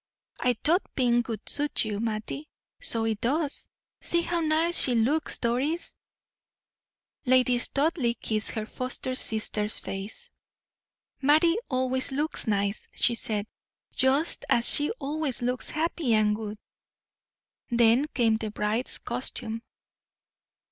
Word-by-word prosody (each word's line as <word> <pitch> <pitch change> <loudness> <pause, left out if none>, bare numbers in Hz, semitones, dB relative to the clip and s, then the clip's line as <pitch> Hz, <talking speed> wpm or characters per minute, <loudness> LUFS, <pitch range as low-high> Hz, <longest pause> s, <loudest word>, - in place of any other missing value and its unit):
"I 250 - +2
thought 345 +6 +3
pink 240 -2 +2
would 220 -3 -6
suit 290 -5 0
you, 210 -2 -3
Mattie; 225 +6 -4 0.3
so 230 - -1
it 220 -2 -2
does. 290 +4 -1 0.3
See 340 - +1
how 345 0 -1
nice 325 +2 +3
she 250 - +5
looks, 275 +8 +1
Doris." 265 +8 -1 1.3
Lady 250 -1 +4
Studleigh 275 -3 +1
kissed 215 -2 -1
her 215 -1 -3
foster 255 +2 -3
sister's 215 -3 -1
face. 210 - -7 0.9
"Mattie 315 +6 +4
always 260 0 +1
looks 295 -1 -2
nice," 200 -1 -1
she 240 - +3
said, 215 -3 -2 0.5
"just 270 +5 +2
as 235 - +6
she 295 +1 +7
always 290 -3 -2
looks 250 +1 -1
happy 310 -6 0
and 210 -1 +3
good." 215 -1 -6 1.1
Then 235 +2 +4
came 230 -6 +1
the 220 -1 -4
bride's 210 +4 -1
costume. 235 -2 -3
250 Hz, 120 wpm, -27 LUFS, 220-295 Hz, 1.3 s, she